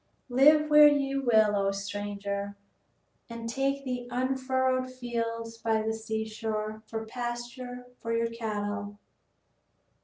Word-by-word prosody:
Live 300 +5 +6
where 300 0 +10
you 275 -2 +2
will, 215 -2 +5
O 195 -1 +2
stranger, 200 0 -4 0.7
and 230 0 -6
take 275 +3 -1
the 250 -1 -3
unfurrowed 260 0 0
fields 230 -2 -4
by 220 -1 +1
the 220 0 0
seashore 220 -1 -3
for 220 0 -4
pasture 245 +1 -5
for 230 - -4
your 230 0 +1
cattle." 205 -2 -3
230 Hz, 115 wpm, -29 LUFS, 215-255 Hz, 0.7 s, where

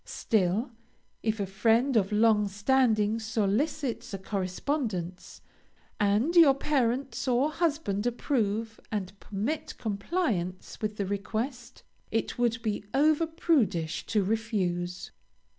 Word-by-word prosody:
Still, 215 +2 0 0.5
if 220 -1 -1
a 200 - 0
friend 225 +7 +2
of 200 -3 +2
long 210 -1 +4
standing 215 +1 +2
solicits 225 +3 -1
a - - -3
correspondence, 190 - -3 0.6
and 210 - +2
your 310 -6 +8
parents 265 -2 0
or 260 +4 +2
husband 295 - 0
approve 225 -3 -1
and 195 -3 -3
permit 290 +10 -3
compliance 200 - -2
with 215 -1 -2
the 200 - -1
request, 225 +6 -4 0.3
it 225 +2 -2
would 230 -1 +1
be 210 -3 -2
over 310 +3 +4
prudish 255 - 0
to 210 -3 +2
refuse. 185 -5 -2
220 Hz, 110 wpm, -28 LUFS, 200-265 Hz, 0.6 s, your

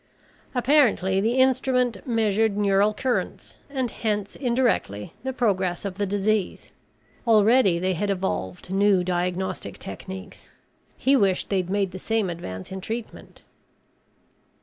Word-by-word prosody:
Apparently 235 -8 +3
the 225 +3 +1
instrument 260 -3 +2
measured 220 -2 +1
neural 200 0 +3
currents 250 +3 -3
and 260 -4 -2
hence 210 -3 -2
indirectly 235 - 0
the 265 - -2
progress 190 -8 0
of 195 0 -5
the 205 - 0
disease. 205 0 -1 0.6
Already 215 -3 +5
they 185 +2 0
had 200 +4 -2
evolved 180 - -3
new 195 -2 +3
diagnostic 180 +1 -2
techniques. 190 0 -9 0.5
He 275 +1 +3
wished 195 -7 +1
they'd 185 -3 0
made 195 -1 0
the 185 - -7
same 220 -2 0
advance 95 - -7
in 190 0 -5
treatment. 225 +4 -7
205 Hz, 125 wpm, -24 LUFS, 185-235 Hz, 0.6 s, Already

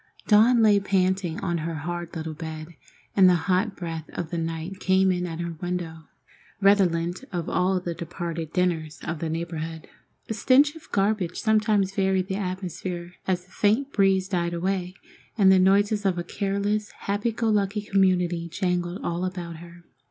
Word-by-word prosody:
Dawn 225 +3 +5
lay 205 -2 +6
panting 190 -3 0
on 175 -3 -1
her 165 +1 -3
hard 175 +3 -5
little 160 -1 -4
bed, 155 0 -7 0.5
and 190 -2 +7
the 180 - +5
hot 195 +2 +1
breath 165 -3 -6
of 165 -2 -5
the 170 - -2
night 165 +3 -4
came 190 0 +3
in 180 0 -1
at 165 -1 -6
her 170 -1 -3
window, 175 -3 -4 0.5
redolent 185 -1 +2
of 175 -3 -3
all 185 +1 +1
the 175 -1 -4
departed 170 -1 -5
dinners 170 -4 -1
of 170 -2 -4
the 165 - -2
neighborhood. 165 -1 -4 0.4
A - - -2
stench 275 +7 +4
of 320 0 -14
garbage 200 -3 0
sometimes 215 -3 +2
varied 190 -1 +1
the 190 - -1
atmosphere 180 -2 -4
as 180 -1 0
the 180 - -26
faint 230 +7 +1
breeze 195 -2 +3
died 175 -3 -1
away, 185 +1 -2 0.4
and 195 -3 +6
the 190 - +6
noises 205 +3 +3
of 190 -3 +1
a 175 - -2
careless, 200 +3 -1
happy 205 +3 -1
go 225 +1 -2
lucky 205 0 +1
community 180 -4 +1
jangled 180 0 -2
all 170 +1 -2
about 175 -3 -4
her. 170 +1 -13
185 Hz, 170 wpm, -25 LUFS, 170-195 Hz, 0.5 s, and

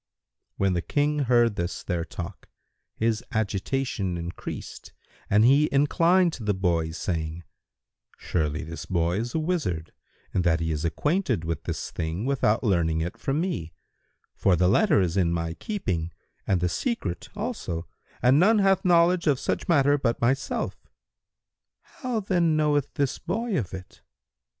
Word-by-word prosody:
When 95 -1 +2
the 85 - 0
King 150 - 0
heard 120 -5 +3
this 85 +1 -3
their 85 -2 -1
talk, 90 +3 -8 0.5
his 115 +1 0
agitation 105 -2 -1
increased 85 +1 -7 0.4
and 105 +2 +5
he 140 +4 +5
inclined 170 +5 +3
to 120 - -7
the 105 -2 +1
boys, 85 -3 0
saying, 80 -1 -3 0.7
"Surely, 75 -3 -1
this 80 0 -7
boy 85 0 +1
is 120 +5 -4
a - - +2
wizard, 150 - -2 0.4
in 90 - +2
that 85 -2 +2
he 80 -1 -1
is 75 0 -2
acquainted 150 - 0
with 80 -2 -3
this - - -4
thing 85 +5 -3
without 130 -5 +1
learning 85 -7 +1
it 85 +2 -3
from 140 +2 -1
me; 90 - -3 0.6
for 95 - +2
the 90 +1 +3
letter 155 - +4
is 90 0 0
in 85 -3 +3
my 85 -1 -2
keeping 85 - -3 0.4
and 95 -3 +2
the 90 - +2
secret 100 - -3
also 85 0 -4 0.4
and 130 +4 +5
none 215 +6 +5
hath 195 -2 +3
knowledge 175 -1 +4
of 140 -4 +3
such - - -2
matter 145 -3 +4
but 120 -4 0
myself. 135 +3 -1 1.1
How 245 -4 -1
then 175 -5 +2
knoweth 145 -2 +1
this 140 -3 0
boy 215 +5 -2
of 110 - -2
it? 95 -1 -10
110 Hz, 155 wpm, -26 LUFS, -, 1.1 s, and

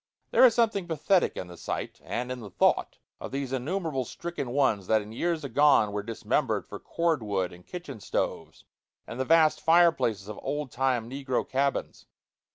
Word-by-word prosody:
There - - +5
is 235 - +5
something 215 -6 +1
pathetic 170 +3 +1
in - - -4
the 90 0 -11
sight, - - -5
and 125 +1 -3
in 125 - -4
the 105 -4 -9
thought - - +1 0.2
of - - -6
those 135 -1 -3
innumerable 145 +1 -2
stricken 170 -1 -5
ones 120 -8 +1
that 110 -1 +3
in 105 - -11
years 165 +6 -1
agone 140 -4 +4
were 105 0 -2
dismembered 115 +2 -1
for - - -9
cord 165 -5 0
wood 95 -4 -2
and 90 0 -16
kitchen 175 -10 -7
stoves 100 - -3 0.4
and 120 - -8
the 130 - 0
vast 160 0 +4
fireplaces 160 - +3
of 105 - -7
old 145 -3 -3
time 125 -2 0
negro 135 0 -2
cabins. 140 +1 -2
135 Hz, 175 wpm, -28 LUFS, 110-160 Hz, 0.4 s, There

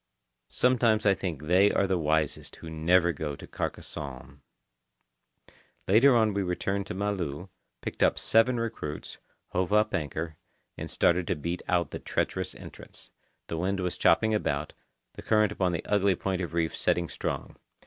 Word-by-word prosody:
Sometimes 115 -4 +2
I 100 - +6
think 90 -6 -4
they 90 +6 +5
are 100 - +2
the 95 -2 0
wisest 80 -1 0
who 80 - -10
never 85 +3 +3
go 75 -1 -4
to - - -11
Carcassonne. 70 -1 -6 1.5
Later 120 +7 +6
on 110 -3 +3
we 100 - 0
returned 95 +2 -2
to - - -5
Malu, 95 -4 -3 0.3
picked - - -6
up - - +4
seven 115 +2 +3
recruits, 115 -10 -5 0.3
hove 90 +1 -1
up 105 +1 +3
anchor, 80 +1 -3 0.4
and - - -6
started 85 0 +2
to 90 - +1
beat 85 +4 -4
out 90 -2 +1
the - - -5
treacherous - - -2
entrance. - - -12 0.3
The 80 - -4
wind 95 +3 -1
was 90 -1 -2
chopping 110 0 +3
about, 75 -8 -1 0.4
the - - -9
current 105 -2 +3
upon 95 -3 0
the 85 - -3
ugly 100 -2 +2
point 95 +1 -2
of 85 -1 -4
reef 80 -1 0
setting 85 -1 +1
strong. 65 - -4
90 Hz, 160 wpm, -28 LUFS, 80-105 Hz, 1.5 s, I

